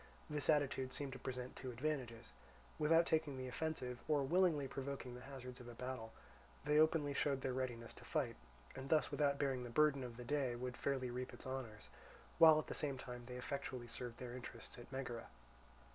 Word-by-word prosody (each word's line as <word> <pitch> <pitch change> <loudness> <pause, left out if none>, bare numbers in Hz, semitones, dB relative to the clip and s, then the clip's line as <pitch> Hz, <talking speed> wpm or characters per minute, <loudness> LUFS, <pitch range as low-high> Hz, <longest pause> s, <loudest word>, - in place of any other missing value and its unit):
This 145 -2 0
attitude 135 -3 +3
seemed 140 -2 -2
to 130 - -7
present 125 0 -4
two 130 - -5
advantages. 125 -3 -2 0.5
Without 165 +2 +6
taking 155 -4 +1
the 130 0 -3
offensive 125 -3 -2
or 150 -2 +3
willingly 160 -2 +4
provoking 135 -1 -4
the 125 - -8
hazards 125 -1 -8
of 120 - -9
a 120 - -8
battle, 125 -3 -4 0.5
they 150 +1 +5
openly 155 -2 +4
showed 140 -1 +1
their 130 - 0
readiness 120 -3 -3
to - - -13
fight, - - 0 0.4
and 135 +1 -6
thus 155 -1 +4
without 140 -2 +3
bearing 135 -3 +1
the 120 - -5
burden 140 +1 +4
of 120 -2 -6
the 125 - -6
day 135 -3 +1
would 125 0 -3
fairly 130 -2 0
reap 125 +1 -4
its - - -10
honours; 130 -5 -5 0.5
while 160 -2 +10
at 155 - 0
the - - -4
same 140 -3 -1
time 125 -1 -7
they 125 - -6
effectually 130 -2 -3
served 120 0 -5
their 125 -1 -6
interests 125 -1 -7
at 120 - -11
Megara. 125 -3 -4
130 Hz, 195 wpm, -40 LUFS, 125-145 Hz, 0.5 s, while